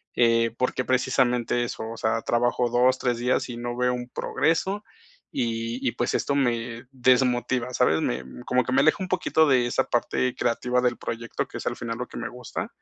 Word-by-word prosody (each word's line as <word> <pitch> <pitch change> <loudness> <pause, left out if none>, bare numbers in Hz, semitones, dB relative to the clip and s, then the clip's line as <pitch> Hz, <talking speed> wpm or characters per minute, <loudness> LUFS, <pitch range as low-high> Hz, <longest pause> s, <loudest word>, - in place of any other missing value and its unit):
Eh, 115 -1 +3
porque, 125 0 0
precisamente, 125 -2 +1
eso, 120 - -4
o 115 - -6
sea, 110 +1 0
trabajo 120 0 +1
2, 125 +2 +3
3 120 -2 0
días 125 +1 +1
y 120 - -5
no 120 0 -4
veo 125 0 +2
un 125 0 -5
progreso, 190 +6 0 0.5
y 115 +2 -2
y, - - +2
pues, 120 - -1
esto 140 - 0
me 120 -2 -1
desmotiva, 125 -1 +2
¿sabes? 80 -12 +3
Me 65 +2 -1 0.2
como 125 0 +2
que 130 - -3
me 135 - +5
aleja 155 +2 +4
un 185 - -2
poquito 160 -4 +2
de 125 -3 +3
esa - - +1
parte 120 +1 0
creativa 125 +1 0
del 120 -1 +1
proyecto, 115 0 -4
que - - -8
es - - -6
al - - -1
final 115 0 -4
lo 125 - -3
que - - -10
me - - -3
gusta, 125 -1 -6
125 Hz, 200 wpm, -25 LUFS, 120-130 Hz, 0.5 s, me